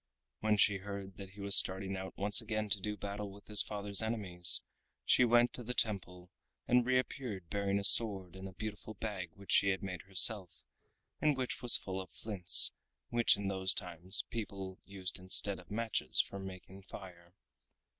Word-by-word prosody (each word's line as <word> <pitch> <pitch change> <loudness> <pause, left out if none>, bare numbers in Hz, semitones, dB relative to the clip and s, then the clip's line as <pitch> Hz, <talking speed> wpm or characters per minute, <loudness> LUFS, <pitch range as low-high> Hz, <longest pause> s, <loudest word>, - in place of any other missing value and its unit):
When 110 -1 +1
she 105 0 +3
heard 100 -1 -8
that 100 -2 -9
he 100 +1 -13
was 100 0 +4
starting 95 +1 +3
out 95 0 -8
once 105 +1 +3
again 110 -1 -4
to 100 -1 0
do 105 +1 -4
battle 100 0 -6
with 100 +1 -15
his 105 -1 +4
father's 100 -1 -2
enemies, 100 -6 +4 0.4
she - - +4
went 120 0 +3
into 125 - -6
the 125 +2 -6
temple, 90 -4 -1 0.4
and 125 0 +3
reappeared 125 - -3
bearing 100 -1 -1
a 100 - -3
sword 100 -4 +4
and 95 0 -8
a - - -15
beautiful 110 +3 -8
bag 95 -4 -6
which 100 0 -10
she 100 - +4
had 95 +1 -2
made 90 -3 -6
herself, 95 0 +1 0.6
and 150 -3 +1
which 130 -1 -3
was 120 -1 +5
full 95 0 -6
of 95 - -12
flints, 100 -5 +2 0.4
which 120 -3 +3
in 100 -1 -4
those 95 -1 +1
times 90 0 -3
people 95 -4 -6
used 95 -2 -5
instead 95 +2 0
of - - -17
matches 115 +2 -2
for 100 - -1
making 95 0 -10
fire. 90 -2 -13
100 Hz, 180 wpm, -33 LUFS, 95-110 Hz, 0.6 s, was